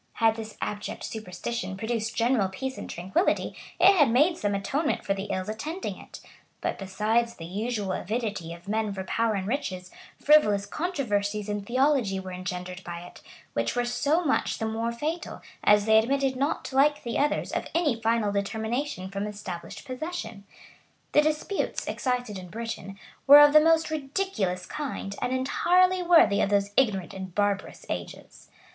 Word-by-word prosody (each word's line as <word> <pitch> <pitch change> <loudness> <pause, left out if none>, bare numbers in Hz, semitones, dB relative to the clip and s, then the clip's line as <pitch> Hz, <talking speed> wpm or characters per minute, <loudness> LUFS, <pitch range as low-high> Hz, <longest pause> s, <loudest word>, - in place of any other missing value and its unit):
Had 225 -1 +3
this 220 -1 -8
abject 210 0 -5
superstition 195 -1 -5
produced 225 0 -2
general 230 -4 +2
peace 265 +7 -4
and - - -7
tranquillity, 190 - 0 0.2
it 390 +2 +7
had 295 -8 +5
made 295 +9 +4
some 205 -8 -1
atonement 285 +10 -1
for 195 - +1
the 195 0 -4
ills 185 -2 -3
attending 300 - -4
it; - - -12 0.4
but - - -3
besides 215 +5 0
the 165 - -8
usual 205 +2 -2
avidity 210 -5 -3
of 170 +2 -11
men 215 0 0
for 190 -1 -4
power 225 +3 0
and 190 -1 -2
riches, 185 -8 -3 0.3
frivolous 210 -10 +4
controversies 210 - -2
in 205 0 -2
theology 255 -4 +2
were 190 -1 -7
engendered 180 0 -5
by 170 0 -6
it, 175 - -12 0.3
which 115 0 -1
were 245 0 +1
so 300 +7 +1
much 280 - +1
the 225 - -2
more 225 +1 -1
fatal, 305 +8 -4 0.2
as 210 0 +5
they 220 0 +6
admitted 270 +3 +1
not, 275 0 -2
like 290 +2 +3
the 235 -1 -2
others, 295 +1 0
of - - -2
any 295 -9 +1
final 225 -2 +1
determination 220 +2 -2
from 200 +1 -3
established 205 -2 -7
possession. 255 - -6 0.7
The 295 - +6
disputes, 310 +6 -1
excited 245 -6 -2
in 180 - -9
Britain, 220 -2 -6 0.3
were 285 +1 +11
of 295 0 +8
the 305 - +9
most 320 0 +3
ridiculous 270 - -2
kind, 265 -9 -5
and 245 - -1
entirely 360 +8 +3
worthy 335 - +5
of - - +1
those 200 0 +1
ignorant 205 -9 +1
and 190 -2 -7
barbarous 205 -1 -1
ages. - - -7
225 Hz, 165 wpm, -27 LUFS, 200-275 Hz, 0.7 s, were